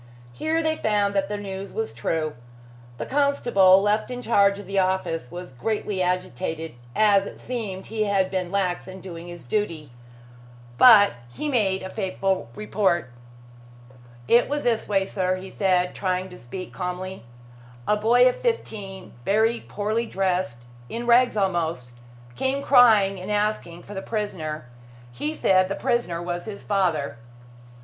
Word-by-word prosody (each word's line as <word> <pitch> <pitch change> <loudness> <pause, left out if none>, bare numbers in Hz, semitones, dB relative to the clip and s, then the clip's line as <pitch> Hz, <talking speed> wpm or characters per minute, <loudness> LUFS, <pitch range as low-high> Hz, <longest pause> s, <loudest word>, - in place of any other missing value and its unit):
Here 320 - 0
they 315 0 0
found 205 -2 +1
that 195 0 0
the 210 - -2
news 195 -1 -6
was 225 0 -3
true. 155 +6 -2 0.6
The - - -4
constable 240 -10 +4
left 210 +3 +1
in 250 0 -5
charge 200 -3 +4
of 205 - -9
the 195 0 0
office 185 -7 -1
was 175 -5 -8
greatly 205 - -2
agitated, 165 -3 -2 0.2
as 200 -2 +4
it - - -10
seemed 210 -7 -5
he 220 -1 -1
had 195 -2 +1
been 180 -2 -2
lax 190 -3 -1
in 190 0 -9
doing 175 -2 -9
his 175 -1 -9
duty. 155 - -2 0.9
But 215 -5 +8 0.2
he 300 - -4
made 195 -8 +1
a 190 - -5
faithful 190 - -1
report. 190 -9 0 1.2
"It 240 +2 +4
was 290 0 -1
this 235 -2 0
way, 195 -2 +1
sir," 185 -1 -1
he 185 +1 -8
said, 180 -3 +1
trying 185 -1 -2
to 180 - -10
speak 180 +10 -8
calmly. 185 -1 -5 0.6
"A 210 - +4
boy 235 +4 +5
of 250 - +3
fifteen, 205 - -4
very 220 - +2
poorly 215 +3 -2
dressed 185 - -1 0.3
in 235 +1 -4
rags 240 -1 +4
almost 165 -10 -1 0.4
came 270 - -1
crying 220 -8 +5
and 185 - -7
asking 205 -5 -1
for 205 - -10
the 190 - -4
prisoner. 175 - -4 0.5
He 145 +6 -3
said 185 0 +3
the 195 - -1
prisoner 175 -8 -1
was 175 0 -4
his 210 -2 -7
father." 175 -10 0
195 Hz, 155 wpm, -24 LUFS, 180-215 Hz, 1.2 s, But